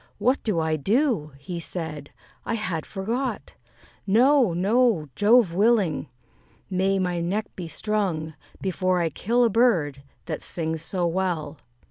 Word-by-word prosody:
"What 255 +3 +1
do 205 -7 0
I 160 -1 0
do?" 205 - +1
he 170 +5 -6
said; 160 -4 -5 0.3
"I 230 - -2
had 185 -8 -3
forgot: 230 +7 -3 0.5
No, 245 +2 +4
no, 195 - +2
Jove 210 - +4
willing! 195 - +2 0.6
may 190 +1 +1
my 180 -2 -1
neck 200 +5 -1
be 175 -3 -6
strung, 165 -3 -2 0.3
Before 185 -1 0
I 165 -2 0
kill 235 - +1
a 235 - +4
bird 175 - +2 0.2
that 155 -3 -4
sings 160 -2 -2
so 175 +2 -1
well." 165 -4 -2
185 Hz, 135 wpm, -25 LUFS, 160-220 Hz, 0.6 s, No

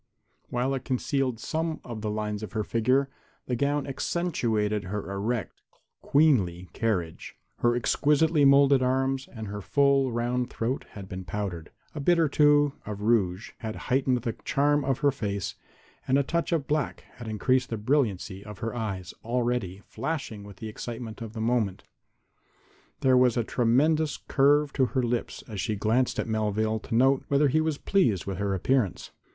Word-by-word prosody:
While 125 +2 0
it 135 - -3
concealed 130 -2 -1
some 160 +5 -2
of 115 -3 -7
the 105 - -2
lines 105 0 -3
of 110 - -7
her 110 -1 0
figure, 130 +6 +2 0.4
the 125 - -1
gown 140 +3 0
accentuated 115 - -1
her 100 +1 -4
erect, 105 +4 -3 0.4
queenly 100 - +2
carriage. 90 -8 -2 0.2
Her 120 0 +2
exquisitely 150 +5 +2
molded 140 -1 +6
arms 130 +1 0
and 110 -3 -7
her 105 +1 -5
full, 135 +6 +3
round 120 +1 -1
throat 120 +4 -3
had 100 -2 -8
been 95 0 -6
powdered, 90 -5 -4 0.2
a 150 - -5
bit 175 +5 +3
or 165 -2 +4
two 145 0 +4
of 105 -1 -6
rouge 105 -3 +1
had 110 -2 -5 0.2
heightened 130 -2 +2
the 115 - -1
charm 145 +1 +2
of 135 -2 0
her 145 -1 +4
face 100 -7 -3 0.5
and 130 - +3
a 140 - +3
touch 170 +6 -1
of 160 -5 +1
black 150 +1 -1 0.2
had 120 - -8
increased 125 +4 +1
the 115 - -2
brilliancy 105 -6 0
of 105 -2 -9
her 115 0 -4
eyes, 100 -6 -4
already 120 -5 -1
flashing 135 -10 -4
with 100 -1 -12
the 110 - -6
excitement 115 +1 -7
of 110 -1 -6
the 110 - -5
moment. 110 -4 0 1.2
There 130 -1 +5
was 125 -2 +4
a 120 - +2
tremulous 145 +8 +2
curve 145 +1 +2
to 130 - +3
her 125 +3 -1
lips 120 0 -2
as 105 -4 -4
she 110 -3 -1
glanced 115 +5 +1
at - - 0
Melvale 110 0 0
to 115 - -4
note 135 +3 +4
whether 140 +1 +3
he 155 +4 +2
was 155 -2 -1
pleased 120 - +1
with 95 -1 -4
her 100 -1 0
appearance. 115 0 0
120 Hz, 170 wpm, -27 LUFS, 105-140 Hz, 1.2 s, molded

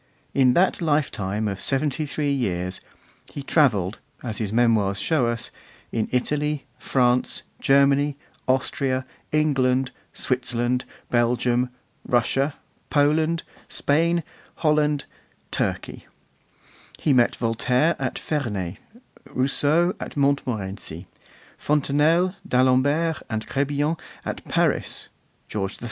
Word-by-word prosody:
In 130 -2 +4
that 185 +1 +3
lifetime 110 - 0
of 100 -1 -4
seventy 145 +2 0
three 145 0 -1
years 95 -9 -1 0.5
he 140 - -6
travelled, 110 - +2 0.2
as 110 -4 -3
his 105 -3 -2
Memoirs 110 -4 +3
show 150 -7 +2
us, 115 0 -2 0.4
in 110 -2 -1
Italy, 150 +3 0
France, 125 -1 +1 0.2
Germany, 140 +1 +3 0.3
Austria, 130 0 0 0.3
England, 135 -4 +2 0.2
Switzerland, 125 -1 0 0.3
Belgium, 120 +1 +2 0.3
Russia, 135 +4 +1 0.3
Poland, 155 +3 +2 0.3
Spain, 165 +3 +2 0.3
Holland, 150 -2 +2 0.5
Turkey; - - -2 0.9
he 150 - +2
met 120 -2 +4
Voltaire 125 +7 +1
at 130 -1 -2
Ferney, 105 - -3 0.5
Rousseau 150 +7 +2
at - - -7
Montmorency, 110 - -1 0.5
Fontenelle, 150 +5 +2
d'Alembert 140 +6 +3
and 110 -1 -2
Crebillon 145 +3 0 0.3
at - - -4
Paris, - - 0 0.4
George 100 -1 -3
III. - - -14
135 Hz, 100 wpm, -24 LUFS, 120-150 Hz, 0.9 s, In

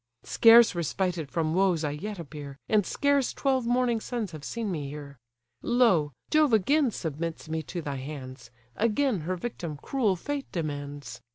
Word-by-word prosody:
Scarce 230 -1 +7
respited 175 -2 -2
from 160 0 -1
woes 180 -3 +2
I 150 - 0
yet 200 +8 -5
appear, 145 -4 -8
And 210 -4 +2
scarce 285 -2 +1
twelve 260 -3 0
morning 245 -1 +2
suns 230 -7 -4
have 155 -3 -9
seen 225 +1 -3
me 145 -5 -4
here; 140 -2 -9 0.4
Lo! 225 -12 +3 0.2
Jove 305 -5 +4
again 270 +7 +3
submits 165 -4 -4
me 160 0 -2
to 170 +2 -6
thy 140 -2 -4
hands, 130 -3 -8 0.3
Again, 230 +1 +1
her 185 - 0
victim 170 -6 -5
cruel 215 - 0
Fate 285 +9 -5
demands! 145 -6 -5
175 Hz, 160 wpm, -27 LUFS, 150-235 Hz, 0.4 s, Scarce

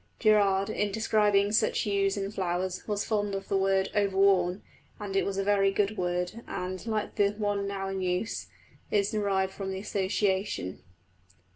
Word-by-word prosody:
Gerarde, 205 -2 +3
in 205 -1 0
describing 210 -2 +2
such 220 - +2
hues 200 -1 +1
in 195 0 -3
flowers, 185 -2 -2
was 205 -1 -1
fond 205 -2 -1
of 195 0 -6
the - - +1
word 195 0 +2
"overworn"; 195 -2 +2 0.4
and 200 -2 -5
it 195 - +3
was 195 -1 -2
a 195 - +1
very 200 -1 +3
good 205 +1 0
word, 180 +3 -2
and, 185 0 -4
like 215 -2 -2
the 200 -1 +4
one 205 -1 -1
now 195 -1 -3
in 195 0 -3
use, 185 +4 -2 0.4
is 205 -1 +1
derived 195 -3 0
from 195 -1 -5
the 190 - -4
association. 190 - -1
195 Hz, 165 wpm, -28 LUFS, 190-205 Hz, 0.4 s, the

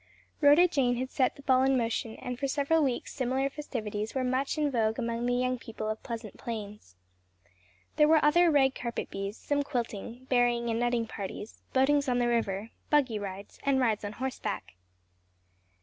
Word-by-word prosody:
RHODA 295 +5 +7
JANE 265 -7 +1
had 255 +2 -3
set 260 -3 +1
the 280 - -14
ball 260 -2 +4
in 265 0 +3
motion 230 -1 -1
and 250 -1 -6
for 275 - 0
several 290 +4 +2
weeks 260 -4 -2
similar 265 +1 0
festivities 220 -7 -4
were 260 - 0
much 260 +4 0
in 300 -2 +1
vogue 220 -3 +1
among 235 0 -2
the 245 - +2
young 255 0 0
people 220 -2 -6
of 215 0 -3
Pleasant 225 -4 -7
Plains. 210 - -7 1.0
There 300 - +6
were 315 -1 +5
other 340 +3 +5
rag 270 -3 +4
carpet 235 -2 -4
bees, 195 +2 -4
some 290 0 0
quilting, 240 -2 -4
berrying 240 -2 +2
and 225 - -1
nutting 240 -1 +1
parties, 205 0 -7
boatings 280 +1 +3
on 245 - +2
the 245 -1 +2
river, 225 -3 -1 0.2
"buggy 265 -8 +2
rides," 200 0 -7
and 275 -1 +2
rides 225 -5 +1
on 205 0 -4
horseback. 260 - -4
245 Hz, 180 wpm, -29 LUFS, 225-275 Hz, 1.0 s, RHODA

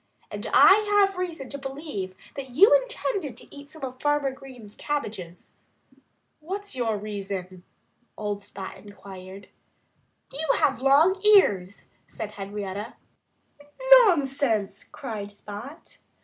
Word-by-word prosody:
And - - -5
I 410 +1 +6
have 390 0 -6
reason 335 -7 -4
to 280 - -6
believe 270 - -6 0.2
that 270 -2 -6
you 400 - +6
intended - - -1
to - - -11
eat 285 0 -12
some 315 -2 -13
of 255 -1 -6
Farmer 290 -2 +1
Green's 255 -6 -13
cabbages." 205 - -5 0.9
"What's 390 +4 -5
your 230 -4 -1
reason?" 195 -3 -6 0.6
old 205 -1 -4
Spot 195 -1 -8
inquired. 195 -1 -12 0.8
"You 300 +1 0
have 265 -3 +1
long 310 +8 +4
ears," 205 - +4 0.2
said 210 - -6
Henrietta. 205 +2 -6 1.0
"Nonsense!" 275 - +1
cried 215 -7 -7
Spot. 210 +8 -11
260 Hz, 115 wpm, -25 LUFS, 205-300 Hz, 1.0 s, I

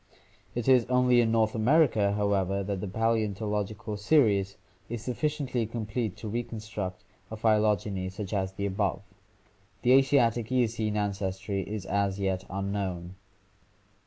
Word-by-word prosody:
It 120 -2 -2
is 130 -3 +5
only 125 -1 +4
in 115 -1 +1
North 110 -1 +2
America, 115 -4 +3
however, 100 -1 0
that 100 -1 -3
the 105 - -3
paleontological 105 0 -1
series 100 -5 +2 0.3
is 115 -1 -5
sufficiently 130 -2 -1
complete 110 -2 -3
to 110 - -7
reconstruct 110 -4 -5 0.3
a 110 - -6
phy 110 -1 +3
togeny 100 -3 0
such 95 0 -6
as 95 -2 -1
the 100 +1 -3
above. 100 -1 -1 0.8
The 125 - +4
Asiatic 125 -4 +4
Eocene 115 -4 0
ancestry 100 -1 -2
is 105 0 -5
as 100 0 0
yet 95 -1 -1
unknown. 95 -2 -3
105 Hz, 130 wpm, -28 LUFS, 100-115 Hz, 0.8 s, is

